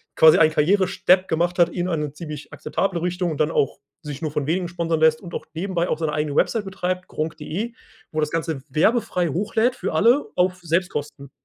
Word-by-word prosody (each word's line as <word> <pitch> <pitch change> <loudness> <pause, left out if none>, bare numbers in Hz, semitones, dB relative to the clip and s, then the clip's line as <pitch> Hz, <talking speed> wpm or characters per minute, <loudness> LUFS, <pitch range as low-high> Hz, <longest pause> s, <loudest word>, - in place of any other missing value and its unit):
quasi 160 -1 +7
einen 160 -1 +5
Karrierestep 185 +2 +3
gemacht 175 +2 0
hat 170 - +5
in 175 0 -2
eine 150 -3 -1
ziemlich 150 -2 -8
akzeptable 170 +5 -2
Richtung 180 0 -1
und 150 - -5
dann 155 +1 +2
auch 140 - 0 0.2
sich 145 -1 -7
nur 155 - -1
von 150 -1 -2
Wenigen 175 +2 0
sponsern 170 -2 -1
lässt 160 0 +4
und 175 -2 -10
auch - - -4
nebenbei 175 0 -1
auch - - 0
seine 160 -2 -1
eigene 150 -1 -1
Website 225 -3 +1
betreibt, 185 -1 -3
Gronkh.de, 160 +8 -4 0.4
wo 155 - -2
er - - +2
das 150 0 -1
Ganze 160 -3 -2
werbefrei 180 - +1
hochlädt 220 - +1
für - - -3
alle 235 - +4
auf 180 0 +1
Selbstkosten. 155 -5 -2
170 Hz, 200 wpm, -23 LUFS, 155-185 Hz, 0.4 s, quasi